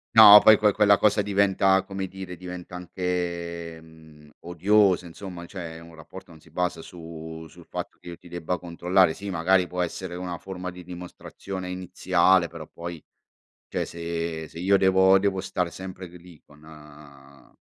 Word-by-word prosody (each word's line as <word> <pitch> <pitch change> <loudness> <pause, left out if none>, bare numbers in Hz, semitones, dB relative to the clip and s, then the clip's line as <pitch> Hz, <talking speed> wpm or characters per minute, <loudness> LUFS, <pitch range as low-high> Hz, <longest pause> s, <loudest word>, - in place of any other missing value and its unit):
No, 105 -2 +11
poi 110 -1 +8
que 105 -1 +3
quella 100 -1 +5
cosa 105 0 +3
diventa, 95 -1 +2
come 95 0 -5
dire, 95 -1 -8
diventa 90 0 -9
anche, 85 -2 -4
mhmm, 80 -2 -18
odiosa 90 +2 +2
insomma, 85 0 -9
cioè 85 -4 -8
un 85 0 -14
rapporto 85 +3 -13
non 80 - -15
si 85 - -21
basa 90 0 -2
su 80 -1 -10
sul - - -17
fatto - - -7
che - - -17
io 85 -1 -8
ti 85 - -17
debba 85 +1 -3
controllare. 90 0 +1
Sì, 100 0 -8
magari 90 +1 +2
può 90 0 -2
essere 90 +1 -5
una 90 -1 -5
forma 90 -1 -7
di 90 0 -11
dimostrazione 90 +1 -8
iniziale, 90 0 +2
però - - -10
poi 85 -2 -8 0.7
cioè - - -3
se 85 -1 -4
se 80 - -12
io 100 +3 +3
devo 95 0 +5
devo 95 -1 0
stare 90 -2 -2
sempre 95 0 -8
lì 85 -2 -15
con 75 +1 -20
a 70 -3 -16
90 Hz, 165 wpm, -25 LUFS, 85-95 Hz, 0.7 s, No